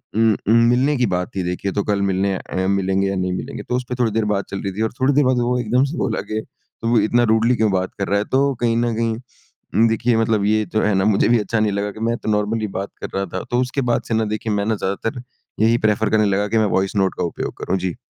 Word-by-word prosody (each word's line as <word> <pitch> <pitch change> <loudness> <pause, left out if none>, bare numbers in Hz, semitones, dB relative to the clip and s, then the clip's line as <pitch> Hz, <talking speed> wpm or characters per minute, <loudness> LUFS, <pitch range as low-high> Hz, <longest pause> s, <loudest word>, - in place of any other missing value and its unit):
उम, 110 0 +4
उम, 110 - +5
मिलने 130 +5 +2
की 125 - +2
बात 90 0 -2
थी 95 - -1
देखिए 90 +2 -2
तो 100 - 0
कल 100 -1 0
मिलने 95 0 +1
अ, 95 0 -3
मिलेंगे 95 0 +1
या 95 - -1
नहीं 90 -1 -1
मिलेंगे? - - -5
तो 125 - -2
उसपे 125 0 -3
थोड़ी 115 -2 +2
देर 110 0 0
बात 100 -2 0
चल 100 - -4
रही 100 - -2
थी 105 - -4
और 110 - 0
थोड़ी 135 +2 +3
देर 145 +2 +4
बाद 130 -1 +2
वो 125 +1 +1
एकदम 120 +2 +2
से 165 - -5
बोला - - -1
कि 110 - -1 0.4
तू 115 +1 +2
इतना 120 +3 +2
रूडली 115 +2 +3
क्यों 110 -3 +1
बात 95 -1 -1
कर 100 - -1
रहा 100 - +1
है? 105 - -2
तो 140 +1 +1
कहीं 115 -1 +2
न 120 -1 +1
कहीं 115 +1 -4 0.5
देखिए 115 +1 +1
मतलब 110 -2 +1
ये 110 +1 +2
तो 110 - +2
है 105 - +2
ना 95 0 +2
मुझे 105 -2 +3
भी 120 0 +4
अच्छा 110 +2 -1
नहीं 110 -1 +2
लगा 100 +1 -2
कि 110 - -12
मैं 115 - +1
तो - - -5
नॉर्मली 105 +1 0
बात 100 - -4
कर - - -4
रहा 100 0 0
था 95 - -3
तो 120 - +2
उसके 130 +2 -1
बाद - - +1
से - - -2
ना 110 0 +1
देखिए 110 0 -3
मैं 100 0 0
ना 110 +1 +1
ज़्यादातर 105 +5 -3 0.4
यही 115 +1 +4
प्रेफर 110 +1 +1
करने 110 -1 +3
लगा 100 +1 +1
कि 115 - 0
मैं 110 - +3
वॉइस 95 +2 -1
नोट 95 -2 +1
का - - -1
उपयोग 85 - -3
करूँ। 95 - 0
जी। 90 -2 -3
110 Hz, 280 wpm, -20 LUFS, 100-115 Hz, 0.5 s, उम